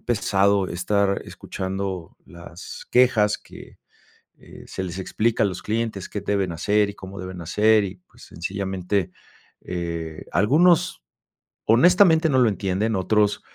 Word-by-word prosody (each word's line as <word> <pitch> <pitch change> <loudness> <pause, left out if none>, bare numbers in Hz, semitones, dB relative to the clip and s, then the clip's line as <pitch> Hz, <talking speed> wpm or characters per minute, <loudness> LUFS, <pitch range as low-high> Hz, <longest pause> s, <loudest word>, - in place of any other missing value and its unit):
pesado 100 -3 +1
estar 100 +2 0
escuchando 95 -2 -5
las 85 0 -11
quejas 120 -4 +4
que, - - -14 0.6
eh, - - -14
se - - -5
les 90 0 -6
explica 110 +5 0
a - - +4
los 90 -2 -4
clientes 110 -3 -3
que 105 - -5
deben 100 -3 -1
hacer 105 +5 +1
y - - -11
cómo 95 0 -10
deben 95 -1 -7
hacer, 105 +6 +3
y 95 0 -6
pues - - -19
sencillamente, 95 +1 -3 0.5
eh, 85 -3 -5
algunos 160 - +3 0.6
honestamente 165 - +5
no 135 - +2
lo 125 - +5
entienden. 100 +3 -1
Otros, 105 +2 +1
100 Hz, 135 wpm, -23 LUFS, 90-110 Hz, 0.6 s, honestamente